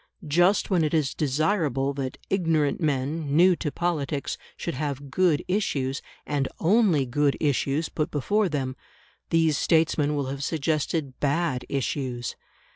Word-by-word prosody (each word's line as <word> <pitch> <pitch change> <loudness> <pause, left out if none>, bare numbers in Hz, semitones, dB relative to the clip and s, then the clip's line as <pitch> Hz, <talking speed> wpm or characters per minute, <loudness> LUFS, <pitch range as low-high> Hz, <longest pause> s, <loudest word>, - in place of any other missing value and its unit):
Just 175 +8 +3
when 175 -4 +3
it 155 +1 +1
is 150 -4 +1
desirable 145 -2 0
that 135 -2 -4
ignorant 165 -5 +1
men, 145 0 -1
new 180 +1 +6
to 150 - -3
politics, 150 -5 -2 0.2
should - - -3
have 140 -1 -4
good 175 0 +2
issues, 140 -9 -1 0.2
and 145 -2 0
only 180 - +3
good 140 +3 +1
issues, 145 +1 0
put 155 - -2
before 205 +8 +1
them, 135 -4 -2 0.5
these 160 -3 +3
statesmen 155 -2 +2
will 140 -2 -1
have 135 +1 -4
suggested 155 -2 -1
bad 145 -2 0
issues. 130 -3 -2
150 Hz, 135 wpm, -26 LUFS, 140-165 Hz, 0.5 s, new